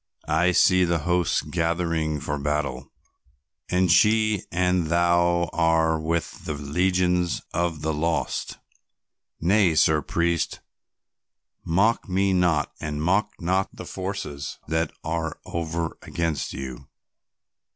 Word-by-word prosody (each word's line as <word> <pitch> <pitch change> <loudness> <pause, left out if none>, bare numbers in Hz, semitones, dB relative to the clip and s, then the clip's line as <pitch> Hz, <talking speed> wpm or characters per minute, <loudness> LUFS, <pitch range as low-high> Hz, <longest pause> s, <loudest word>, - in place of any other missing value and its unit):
I 85 +4 +3
see 90 +1 +4
the 85 -1 +1
hosts 90 -2 +1
gathering 85 -2 -1
for 75 +1 -3
battle 70 -3 -2 0.8
and 90 -1 +2
she 105 +2 +4
and 90 -1 +1
thou 85 +1 +2
are 80 -1 +2
with 85 +1 -3
the 80 - -3
legions 90 +4 0
of 85 -2 -1
the 80 0 0
lost. 80 +2 -2 0.8
Nay, 90 -1 +3
Sir 80 0 +4
Priest, 85 +3 -1 1.0
mock 100 +7 +1
me 95 +1 +2
not 85 -5 +2
and 75 -1 -4
mock 95 +6 +1
not 95 +2 -1
the - - -8
forces 95 -7 -5
that 80 0 0
are 80 0 -3
over 85 0 -3
against 80 -4 -2
you." 65 0 -7
85 Hz, 115 wpm, -24 LUFS, 80-90 Hz, 1.0 s, see